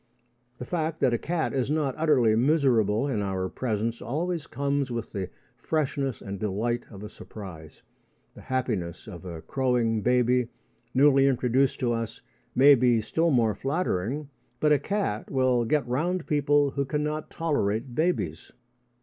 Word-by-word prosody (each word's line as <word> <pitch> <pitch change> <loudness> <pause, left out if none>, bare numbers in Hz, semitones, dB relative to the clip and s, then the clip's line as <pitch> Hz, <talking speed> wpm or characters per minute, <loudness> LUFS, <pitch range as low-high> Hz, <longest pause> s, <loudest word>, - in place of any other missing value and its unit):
The 125 - -6
fact 160 -1 -2
that 120 - +3
a 120 - +1
cat 170 -1 -1
is 130 -1 0
not 150 -3 0
utterly 130 -9 +3
miserable 120 -4 +2
in 115 -7 -1
our 95 -2 -2
presence 115 +2 -2
always 165 +4 -2
comes 140 -1 -1
with 120 -1 -4
the 95 -4 -4 0.3
freshness 140 -5 -1
and 100 -1 -6
delight 110 +4 -1
of 100 -2 -10
a - - -5
surprise. 90 -8 -11 0.5
The - - -13
happiness 110 -10 -2
of 95 -4 -9
a 85 -3 -7
crowing 120 -4 0
baby, 125 +1 +2 0.5
newly 135 0 +5
introduced 130 0 +2
to 120 -2 +1
us, 115 -2 -4 0.4
may 140 +3 +8
be 125 -3 +4
still 160 +10 0
more 115 -7 +3
flattering, 140 - -2 0.3
but 150 - +3
a 145 - +3
cat 195 - -2
will 130 -3 +2
get 150 +2 +1
round 165 +8 -1
people 145 -1 +2
who 140 0 -1
cannot 150 +2 -2
tolerate 125 -7 -1
babies. 155 - -1
125 Hz, 150 wpm, -27 LUFS, 110-145 Hz, 0.5 s, may